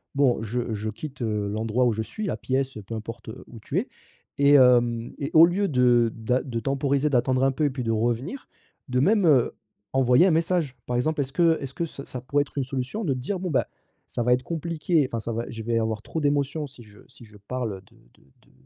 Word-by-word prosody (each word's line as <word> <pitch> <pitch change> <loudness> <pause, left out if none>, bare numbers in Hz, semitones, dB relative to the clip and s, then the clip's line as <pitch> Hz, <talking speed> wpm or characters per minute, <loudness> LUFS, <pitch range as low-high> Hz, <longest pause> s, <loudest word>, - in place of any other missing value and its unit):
«Bon 135 -4 +3
je 120 +1 -2
je 110 +1 -3
quitte, 135 +5 -8
heu, 105 -3 -1
l'endroit 110 +4 0
où 120 - +3
je 110 - -2
suis, 215 - -6
la 180 - -2
pièce», 130 -1 -2
peu 115 - -5
importe, 110 +1 -7 0.2
où - - -11
tu - - -4
es - - -4 0.5
et 140 0 +5
hem 120 -3 +4
et 140 - -2
au 160 +1 +10
lieu 190 +4 0
de 125 -5 +3
d'a 125 +3 0
de 120 -4 -3
temporiser, 140 +3 0
d'attendre 130 0 +2
un 135 - +4
peu 150 +3 0
et - - +3
puis 130 -1 -4
de 115 - -1
revenir, 120 - -2 0.4
de 125 0 +1
même, 200 +4 +3
heu, 135 -6 +4 0.4
envoyer 130 +3 +5
un 185 - +3
message. 165 -4 0
Par 125 - -2
exemple, 150 +4 0
est-ce 135 -1 -4
que 165 0 +3
est-ce 135 -1 -6
que 170 - -1
ça 140 -4 -9
ça 125 - -7
pourrait 145 +3 +1
être 145 - -18
une 140 - +1
solution 130 - -4
de 140 - +1
te 130 - -4
dire: 185 +10 -3
«Bon, 180 -1 -3
bah, 135 - +1 0.4
ça 120 - -3
va 125 +1 +4
être 125 +1 0
compliqué, 165 -2 0
enfin 115 - -3
ça 115 +1 -4
va, 115 +1 -3
je 115 -2 -7
vais 115 +1 0
avoir 110 -1 -2
trop 160 - -4
d'émotions 145 +1 0
si 130 -2 -14
je 105 -1 -17
si 120 - -16
je 105 -1 -16
parle, 115 +2 -4
heu, 95 - -9
de - - -22 0.2
de - - -24 0.2
de - - -25
130 Hz, 245 wpm, -25 LUFS, 115-145 Hz, 0.5 s, au